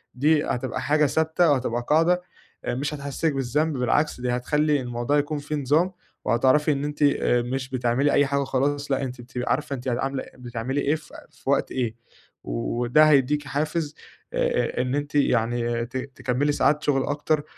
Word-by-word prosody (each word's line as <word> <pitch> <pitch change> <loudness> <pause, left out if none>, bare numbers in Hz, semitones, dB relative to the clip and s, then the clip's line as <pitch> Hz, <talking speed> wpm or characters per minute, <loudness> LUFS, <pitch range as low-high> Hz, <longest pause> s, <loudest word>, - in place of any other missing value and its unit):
دي 150 +3 +3
هتبقى 125 0 -2
حاجة 150 +1 +3
ثابتة 160 +3 +2
وهتبقى 125 -3 0
قاعدة 170 +4 +4 0.4
آآ - - -1
مش 145 +4 -2
هتحسّسك 145 +2 -2
بالذنب 140 +3 0
بالعكس، 125 +2 +1
دي 125 - 0
هتخلّي 150 +4 +1
الموضوع 120 +3 -1
يكون 145 +1 0
فيه 150 +1 -4
نظام، 150 +7 +2 0.3
وهتعرفي 135 +6 +3
إن 140 0 -1
أنتِ 150 0 -2 0.5
مش 135 -1 -3
بتعملي 130 +2 +1
أي 145 - +4
حاجة 140 0 0
وخلاص 140 +2 -1
لأ 135 0 +1
أنتِ 125 -1 -5
بتبقي 125 0 -4
عارفة 140 0 -1
أنتِ 130 0 -8
عاملة 135 +2 -1
بتعملي 125 +3 -3
إيه 145 +3 +2
في 150 - -12 0.2
في - - -8
وقت - - +1
إيه، 120 -4 -2 0.5
وده 120 +5 +2
هيدّيكي 145 0 +2
حافز 150 +2 -2 0.4
آآ - - +1 0.3
آآ - - +4
إن 125 +2 -1
أنتِ 145 +1 -3
يعني 120 -3 +1
ت 130 +2 -6
تكمّلي 130 +2 -1
ساعات 145 +1 +2
شغل 135 -2 +2
أكتر، 145 +1 0
140 Hz, 170 wpm, -24 LUFS, 125-150 Hz, 0.5 s, قاعدة